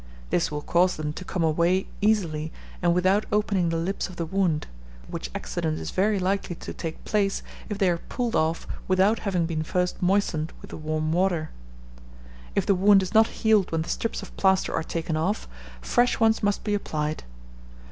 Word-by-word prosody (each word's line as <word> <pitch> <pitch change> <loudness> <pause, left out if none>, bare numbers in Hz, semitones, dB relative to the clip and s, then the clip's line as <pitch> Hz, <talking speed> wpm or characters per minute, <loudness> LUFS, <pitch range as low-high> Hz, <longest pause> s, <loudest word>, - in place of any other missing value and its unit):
This 175 - +2
will 150 0 -4
cause 180 +1 +3
them 150 -1 -3
to 185 - -7
come 180 -1 -2
away 170 +4 +2 0.2
easily, 170 -8 +1 0.3
and 175 -1 +3
without 190 +4 +2
opening 200 -4 +2
the 165 - 0
lips 190 +4 -2
of 185 - -10
the 170 - -2
wound; 170 -3 0 0.4
which - - -5
accident 80 0 -2
is 80 0 -5
very 205 +2 +2
likely 190 -1 -1
to - - -7
take 160 -1 -6
place, 200 -2 0 0.3
if 210 - -3
they 195 -2 +3
are 175 -1 +1
pulled 240 +4 -3
off 160 +1 +1 0.2
without 190 +4 +3
having 185 -5 0
been 165 -1 -2
first 180 +3 -1
moistened 180 -4 +1
with - - -12
the - - -6
warm 155 0 -1
water. 175 -2 +1 1.0
If - - +2
the 200 - +4
wound 195 +1 +5
is 185 - -5
not 220 0 +6
healed 215 -4 +2
when 165 -1 0
the - - -9
strips 230 - -2
of - - -11
plaster 190 -1 +3
are - - 0
taken 165 0 -3
off, 180 +7 -1 0.3
fresh 245 - +2
ones 225 -1 +3
must 205 -1 0
be 210 - -1
applied. 155 -6 -2
180 Hz, 190 wpm, -26 LUFS, 160-200 Hz, 1.0 s, not